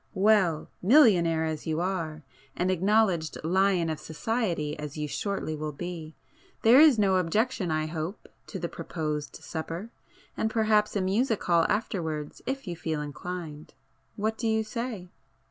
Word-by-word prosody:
Well!—millionaire 190 - +4
as 160 -1 -4
you 160 0 0
are, 165 -4 -2 0.3
and 185 +1 +1
acknowledged 185 -3 +2
lion 185 0 +2
of 155 -1 -3
society 160 -1 -2
as 150 0 -6
you 150 0 -2
shortly 195 0 -3
will 155 0 -4
be, 165 0 -6 0.5
there 235 +4 +8
is 305 -6 +7
no 195 -3 +3
objection 190 +3 0
I 155 0 0
hope, 160 +5 -5 0.2
to 195 - -6
the 175 -2 -3
proposed 155 -3 -4
supper? 170 +7 -6 0.4
And 220 - 0
perhaps 215 -2 +2
a 200 - +1
music 215 +4 +1
hall 170 -1 +3
afterwards 160 -8 -2
if 270 +1 -3
you 175 - -3
feel 160 -2 -3
inclined,—what 155 +6 -6
do 230 - 0
you 220 0 +2
say?" 220 -4 -5
180 Hz, 145 wpm, -28 LUFS, 155-215 Hz, 0.5 s, there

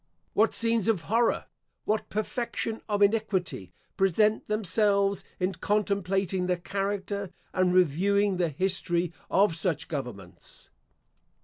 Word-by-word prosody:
What 220 +1 +3
scenes 230 -2 +2
of 205 -7 +1
horror, 230 +5 +1 0.4
what 215 +1 -1
perfection 225 +1 -3
of 205 -1 +2
iniquity, 200 - 0 0.3
present 210 +3 +2
themselves 200 -1 +2 0.2
in 185 +1 0
contemplating 195 -3 0
the 180 -1 +1
character 200 +1 -3 0.2
and 185 -1 +2
reviewing 185 +4 +3
the 175 -2 +1
history 175 +1 -1 0.2
of 195 -2 +3
such 165 -1 -1
governments! 120 - -8
195 Hz, 110 wpm, -28 LUFS, 180-210 Hz, 0.4 s, What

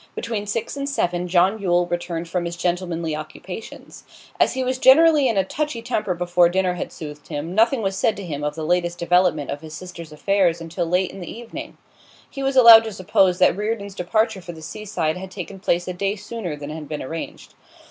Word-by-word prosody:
Between 220 -3 -3
six 220 +6 -3
and 280 0 -3
seven 180 -9 -1
John 185 +4 +2
Yule 175 -2 +2
returned 175 -1 -3
from 175 0 -2
his 170 0 -4
gentlemanly 175 -2 -2
occupations. 180 +7 -9 0.4
As - - +3
he 260 - 0
was 255 0 -1
generally 295 +1 +6
in 225 -4 0
a 195 - +4
touchy 270 +3 -3
temper 210 -6 -1
before 175 0 +3
dinner 185 0 +1
had 180 - -5
soothed 150 -2 -9
him, 150 +4 -5
nothing 225 +3 +3
was 195 -1 -1
said 220 +3 +1
to 200 - -6
him 145 -4 -5
of 150 0 -2
the 160 -1 -4
latest 175 +1 0
development 175 -4 +2
of 145 - -5
his 155 -1 -9
sister's 170 -3 -9
affairs 175 +2 +1
until 165 +1 -3
late 180 +2 +1
in - - -10
the 175 - -7
evening; 235 0 -8 0.5
he 275 - -8
was 270 0 0
allowed 230 -3 +10
to 220 - -4
suppose 185 -1 +2
that 185 - +4
Reardon's 205 -1 -3
departure 215 +2 0
for 175 0 -8
the 160 -1 -12
seaside 175 -3 -3
had 190 +1 -7
taken 190 +1 -8
place 175 -2 0
a 180 - -3
day 195 +3 -1
sooner 210 -5 -5
than 145 0 -7
had 155 -2 -7
been 150 -1 -4
arranged. 165 +5 -7
180 Hz, 210 wpm, -22 LUFS, 170-215 Hz, 0.5 s, allowed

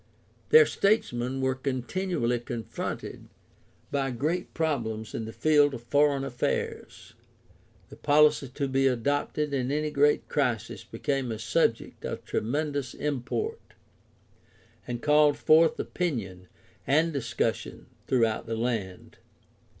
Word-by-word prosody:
Their 465 0 +8
statesmen 135 - 0
were 130 0 +1
continually 130 0 -1
confronted 120 -1 -6 0.6
by 135 -1 0
great 150 +9 -2
problems 115 -9 -2
in 115 - -3
the 110 - -6
field 145 0 +3
of 120 - -9
foreign 140 +2 +2
affairs. 125 -3 -3 0.8
The - - -12
policy 150 -1 +4
to 140 +3 -3
be 135 0 +2
adopted 145 +3 -1
in 130 -1 -1
any 150 +1 -1
great 145 +1 +2
crisis - - -1
became 135 -4 -2
a 110 - -3
subject 115 +1 0
of - - -5
tremendous 145 +2 -2
import 150 - -3 1.3
and 120 -1 -5
called 150 -1 +4
forth 160 +1 +4
opinion 100 - -3 0.4
and 160 +4 +3
discussion 140 -4 -2 0.2
throughout 115 -3 +1
the 115 0 -2
land. 110 -6 -3
135 Hz, 115 wpm, -27 LUFS, 120-150 Hz, 1.3 s, Their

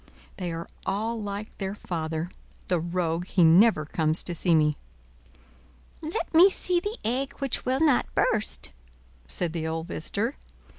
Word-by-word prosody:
They 180 -3 -3
are 165 +1 -5 0.2
all 220 +3 -1
like 205 +1 -5
their 195 0 -3
father: 165 -2 -3 0.4
the 180 -2 +2
rogue, 170 0 -1
he 180 - +3
never 165 0 +6
comes 155 +1 0
to 175 - -2
see 170 0 +3
me." 150 -1 +3 1.3
"Let 325 +6 -4
me 345 +5 +8
see 360 -2 0
the 415 +6 -4
egg 265 +4 -1
which 275 -3 -3
will 260 +3 +1
not 295 -6 +3
burst," 215 -1 +1 0.6
said 170 - -2
the 160 -2 -2
old 160 0 -3
visitor. 80 - -2
185 Hz, 150 wpm, -27 LUFS, 165-235 Hz, 1.3 s, me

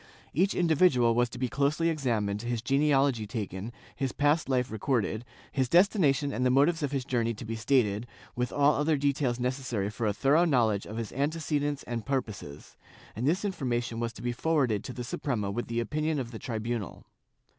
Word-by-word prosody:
Each 185 +7 +2
individual 155 -8 +4
was 120 +1 +2
to 125 - -9
be 130 +1 0
closely 145 +6 +1
examined, 115 -10 -1
his 120 -1 -3
genealogy 135 -5 +2
taken, 105 0 -5 0.2
his 135 -2 -2
past 145 +1 +2
life 125 -1 +1
recorded, 110 0 -1 0.3
his 130 -3 0
destination 160 - +3
and 125 - -1
the 130 - +4
motives 145 +6 +3
of 145 -2 -1
his 135 -3 -2
journey 115 -3 0
to 115 - -8
be 115 +1 -4
stated, 115 -2 +1 0.3
with 125 0 -1
all 145 +1 +4
other 150 +2 +1
details 140 -3 0
necessary 125 -5 -2
for 110 +1 -2
a - - +2
thorough 145 - +3
knowledge 115 - +2
of 110 - -6
his 115 -2 -4
ante 145 +5 -1
cedents 145 -3 -1
and 120 -2 -4
purposes, 105 - -5 0.4
and 120 +5 -1
this 185 +7 +1
information 120 - -2
was 115 -1 -1
to - - -11
be 120 - 0
forwarded 130 -6 +1
to - - -5
the 125 - -5
Suprema 120 -5 -2
with 120 +4 -3
the 115 0 -2
opinion 155 +5 -1
of 125 -4 -4
the 110 - -7
tribunal. 115 -4 -4
125 Hz, 190 wpm, -29 LUFS, 115-145 Hz, 0.4 s, individual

